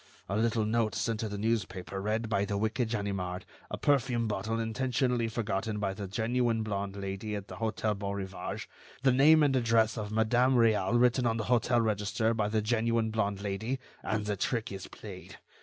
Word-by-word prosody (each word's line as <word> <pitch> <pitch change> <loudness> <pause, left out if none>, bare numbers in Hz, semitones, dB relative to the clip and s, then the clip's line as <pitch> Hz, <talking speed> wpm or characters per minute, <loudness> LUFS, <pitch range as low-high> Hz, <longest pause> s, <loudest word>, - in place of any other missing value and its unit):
A 100 - -2
little 110 0 +1
note 110 0 +1
sent 115 -2 -1
to 110 - -2
the 105 - -4
newspaper 100 -3 -2
read 110 +3 -1
by 100 -2 +1
the 100 0 -1
wicked 110 +3 0
Ganimard, 100 -4 -3 0.2
a - - -4
perfume 125 -5 +2
bottle 110 +2 -2
intentionally 125 +1 0
forgotten 110 -1 -2
by 100 -2 -1
the 100 0 -6
genuine 115 +2 0
blonde 100 -2 -3
Lady 100 +2 -4
at 100 -1 -6
the - - -8
Hôtel 110 -2 -1
Beaurivage, 100 -1 -4 0.4
the 135 - +5
name 150 +5 +6
and 140 -2 +3
address 115 -2 +2
of 105 -1 -4
Madame 120 +4 +3
Réal 115 -2 +3
written 125 0 +3
on 115 0 +1
the 110 - -1
hotel 120 0 +3
register 110 +1 0
by 110 -2 0
the 110 0 0
genuine 115 0 +1
blonde 100 -2 -1
Lady, 110 +6 -2 0.2
and 105 +1 -2
the 105 -1 -1
trick 115 +3 -1
is 95 -1 -6
played. - - -10
110 Hz, 185 wpm, -30 LUFS, 100-115 Hz, 0.4 s, name